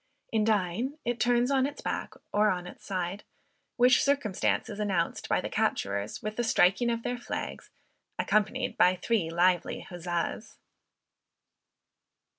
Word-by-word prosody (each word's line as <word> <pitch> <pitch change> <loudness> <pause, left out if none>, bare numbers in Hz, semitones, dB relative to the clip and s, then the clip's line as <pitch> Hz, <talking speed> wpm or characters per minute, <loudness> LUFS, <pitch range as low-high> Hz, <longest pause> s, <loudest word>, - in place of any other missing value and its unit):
In 220 -1 +2
dying, 215 - 0
it 240 -1 -1
turns 245 +2 +3
on 265 -1 +3
its 290 - -8
back - - -4 0.2
or 210 +1 +4
on 180 -2 -1
its 180 - -11
side; 185 +1 -3 0.5
which 250 +1 +5
circumstance 280 -9 +1
is 200 - -7
announced 190 -5 -1
by - - +3
the - - -3
capturers 100 +1 -1
with 215 0 -4
the 240 - +1
striking 225 +1 +3
of 230 -1 -1
their 245 0 -2
flags, - - -5 0.5
accompanied 210 -2 0
with 180 0 +5
three 215 -8 +1
lively 175 +1 +2
huzzas! 175 +5 -4
210 Hz, 140 wpm, -29 LUFS, 180-240 Hz, 0.5 s, which